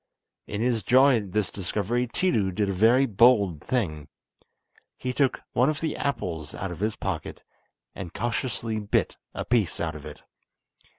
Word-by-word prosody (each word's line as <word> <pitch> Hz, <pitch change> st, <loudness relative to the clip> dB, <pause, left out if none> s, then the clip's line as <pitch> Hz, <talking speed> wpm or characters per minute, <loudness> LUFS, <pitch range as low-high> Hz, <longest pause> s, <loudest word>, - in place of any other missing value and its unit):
In 100 Hz, +1 st, -3 dB
his 120 Hz, -2 st, +1 dB
joy 130 Hz, +2 st, +5 dB
at 100 Hz, -4 st, -5 dB
this 105 Hz, 0 st, 0 dB
discovery 105 Hz, +6 st, -1 dB
Tiidu 115 Hz, -, +1 dB
did 105 Hz, 0 st, +1 dB
a -, -, 0 dB
very 115 Hz, +8 st, +5 dB
bold 100 Hz, -, +4 dB
thing. 80 Hz, -, -2 dB, 0.9 s
He 125 Hz, 0 st, -3 dB
took 135 Hz, -1 st, +1 dB
one 125 Hz, +4 st, +3 dB
of 155 Hz, -1 st, -2 dB
the 160 Hz, -2 st, -2 dB
apples 80 Hz, -, -3 dB
out 95 Hz, -1 st, -4 dB
of 85 Hz, -, -7 dB
his 105 Hz, +2 st, -1 dB
pocket, 85 Hz, -5 st, -4 dB, 0.5 s
and 90 Hz, -4 st, -7 dB
cautiously 115 Hz, -2 st, -2 dB
bit 105 Hz, -1 st, 0 dB, 0.2 s
a -, -, -3 dB
piece 115 Hz, -6 st, +1 dB
out 80 Hz, -2 st, -2 dB
of 75 Hz, -1 st, -9 dB
it. -, -, -11 dB
110 Hz, 165 wpm, -26 LUFS, 95-125 Hz, 0.9 s, joy